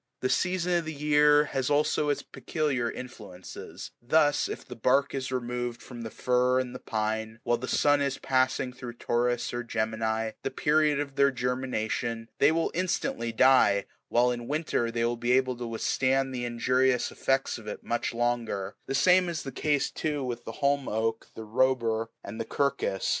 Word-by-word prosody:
The 130 - 0
season 180 +1 +1
of 165 - -6
the 160 - -4
year 150 0 +5
has 135 -2 -2
also 150 0 +2
its 145 - 0
peculiar 135 -3 -2
influences; 105 -9 -9
thus, 145 +4 +3
if - - -6
the 125 - -8
bark 135 +4 +2
is 130 -1 -3
removed 120 -1 -3
from 120 -2 -9
the 115 - -5
fir 125 +2 +2
and 125 -1 -3
the 125 - -7
pine, 110 0 -3
while 120 - +1
the 125 - -5
sun 145 +1 +3
is 140 -1 0
passing 130 0 +1
through 125 -1 -8
Taurus 120 +1 -1
or 120 - -2
Gemini, 110 -1 -1
the - - -2
period 150 +2 +2
of 140 -1 -4
their 140 0 +5
germination, 120 -3 -2
they 145 - +6
will 165 0 0
instantly 165 -9 -1
die, 115 -5 +4 0.2
while 125 +1 +3
in 120 -1 -5
winter 150 -5 0
they 115 0 -1
are 120 0 0
able 130 +1 +2
to 120 0 -5
withstand 130 +3 0
the 120 -1 -3
injurious 125 +2 +1
effects 135 -2 0
of 110 - -13
it 105 - -6
much 120 0 -1
longer: 115 -5 -1
the 135 - -1
same 180 +5 +4
is 165 -3 -3
the 135 - -5
case, 145 +2 0
too, 150 -3 -2
with 120 -2 -4
the - - -5
holm 140 -1 +2
oak, 110 +1 -1
the 110 - -7
robur, 115 -1 +1 0.2
and 110 +3 -6
the - - -3
quercus. 135 -8 -1
125 Hz, 180 wpm, -28 LUFS, 115-140 Hz, 0.2 s, they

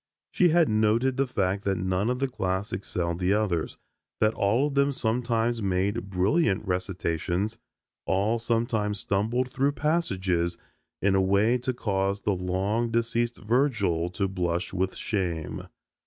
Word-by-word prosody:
She 180 - +4
had 165 -1 +4
noted 110 +5 +2
the 135 0 +1
fact 100 -4 -1
that 100 -1 +1
none 95 +4 0
of 125 - 0
the 135 +1 0
class 95 -4 -2
excelled 90 -3 -2
the 90 +1 +2
others, 95 -7 -1 0.4
that 110 +1 +3
all 115 +8 +2
of 145 - -2
them 140 0 +3
sometimes 120 -1 0
made 100 +3 -1
brilliant 100 - +1
recitations, 90 +2 -2 0.5
all 105 +5 +1
sometimes 115 -3 0
stumbled 115 +7 0
through 140 +2 +1
passages 95 - 0 0.5
in 100 0 +3
a 95 - +4
way 100 +6 +3
to 125 +2 -1
cause 100 -4 -1
the 105 - +1
long 95 +6 -1
deceased 115 +1 0
Virgil 105 - +1
to 100 +2 -1
blush 90 -2 -2
with 95 0 -1
shame. 90 -7 -3
105 Hz, 145 wpm, -27 LUFS, 95-120 Hz, 0.5 s, She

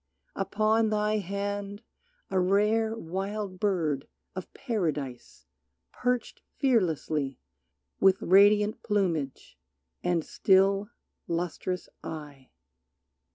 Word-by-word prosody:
Upon 215 +3 +2
thy 210 0 +1
hand 200 +2 -4 0.5
a 190 - +2
rare 210 +4 +2
Wild 195 +1 -4
bird 160 -9 0 0.3
of 185 -1 -7
Paradise 155 - -3 0.5
perched 250 -1 -2 0.2
fearlessly 160 - +1 0.6
With 190 0 +5
radiant 205 +3 +5
plumage 165 - -1 0.4
and 175 -3 +1
still, 195 +1 +3 0.4
lustrous 175 +2 -2 0.2
eye. 145 -4 -8
195 Hz, 80 wpm, -28 LUFS, 165-210 Hz, 0.6 s, With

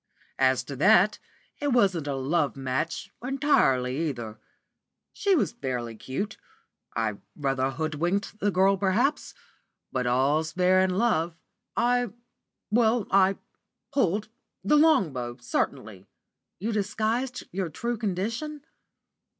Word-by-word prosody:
"As 130 -1 +3
to 140 - -7
that, 205 - +5 0.4
it 290 - -1
wasn't 190 -10 +2
a 140 - -1
love 140 +3 0
match 135 +4 -3
entirely 165 - +2
either. 115 -5 -7 0.7
She 400 -2 +2
was 205 - +1
fairly 120 -4 -4
cute. 135 - -4 0.6
I 110 -3 -1 0.2
rather 135 -2 0
hoodwinked 165 +9 -2
the 205 - +1
girl, 195 +1 +3
perhaps; 205 +9 0 0.6
but 125 -1 -1
all's 145 +6 +1
fair 185 +1 +4
in 185 -1 +1
love. 170 -7 +1 0.4
I 245 -2 +2 0.6
well 225 -1 +3
I 195 0 +4 0.6
pulled, 210 -5 +1 0.3
the 215 +10 +3
long 295 - +4
bow, 120 -1 -5
certainly." 110 -5 -3 0.5
"You 215 +5 -2
disguised 220 +5 -1
your 185 -1 -2
true 235 +10 -3
condition?" 230 - -3
185 Hz, 120 wpm, -27 LUFS, 135-220 Hz, 0.7 s, that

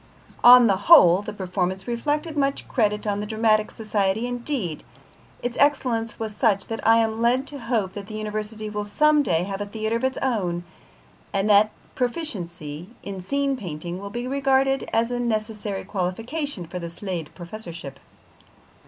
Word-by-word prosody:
On 245 0 +10
the 195 -4 +3
whole, 190 - +8
the 205 - -6
performance 190 0 -3
reflected 300 +7 -1
much 275 -1 0
credit 210 -3 0
on 205 -1 -1
the 210 - -4
Dramatic 215 -1 +2
Society; 210 0 -1
indeed, 245 - -3 0.6
its 245 -1 -2
excellence 250 -6 +1
was 220 -2 -4
such 205 -6 +2
that 225 -1 -3
I 225 0 +7
am 225 0 0
led 250 +3 +2
to 285 -1 -5
hope 225 -6 -1
that 200 -1 -7
the 215 - -7
University 215 0 -4
will 210 0 -3
some 300 +8 +3
day 170 - +1
have 195 +1 -4
a - - -2
theatre 220 +2 -2
of 235 - -7
its 260 0 0
own, 185 -9 -1 0.7
and 195 +1 0
that 205 +1 +6 0.2
proficiency 180 - -3
in 195 -2 -6
scene 275 +7 0
painting 175 -5 -6
will 200 +1 -7
be 240 +3 -4
regarded 270 0 +1
as 230 +2 +1
a 245 - -1
necessary 215 -3 -2
qualification 225 - -3
for 180 +2 -6
the 170 -1 -5
Slade 170 -3 -5
Professorship. 170 -7 -7
215 Hz, 165 wpm, -24 LUFS, 190-245 Hz, 0.7 s, On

